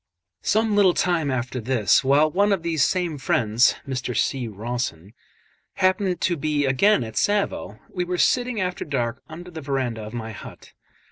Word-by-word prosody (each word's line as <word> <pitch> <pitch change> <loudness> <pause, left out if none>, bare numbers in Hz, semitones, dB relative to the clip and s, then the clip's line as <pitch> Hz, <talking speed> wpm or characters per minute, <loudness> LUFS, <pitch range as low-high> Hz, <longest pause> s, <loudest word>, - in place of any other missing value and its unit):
Some 220 0 +1
little 195 -4 +4
time 170 -5 +1
after 125 0 -2
this, 115 -2 +2
while 145 +3 +4
one 200 +4 +2
of 190 -4 0
these 165 -4 +1
same 175 -5 0
friends 115 -2 +2
(Mr. 130 -3 -3
C. 130 -3 0
Rawson) 110 -4 -5 0.6
happened 185 -1 +1
to 175 - +1
be 150 -1 0
again 135 - +3
at 110 -1 -7
Tsavo, 205 0 0
we 180 - -3
were 180 0 -3
sitting 245 +3 +1
after 180 -1 -2
dark 125 -4 -2
under 175 +3 -9
the 160 -2 -7
verandah 130 -5 -2
of 105 +1 -8
my 110 -1 -5
hut. 105 - -12
145 Hz, 165 wpm, -23 LUFS, 120-180 Hz, 0.6 s, little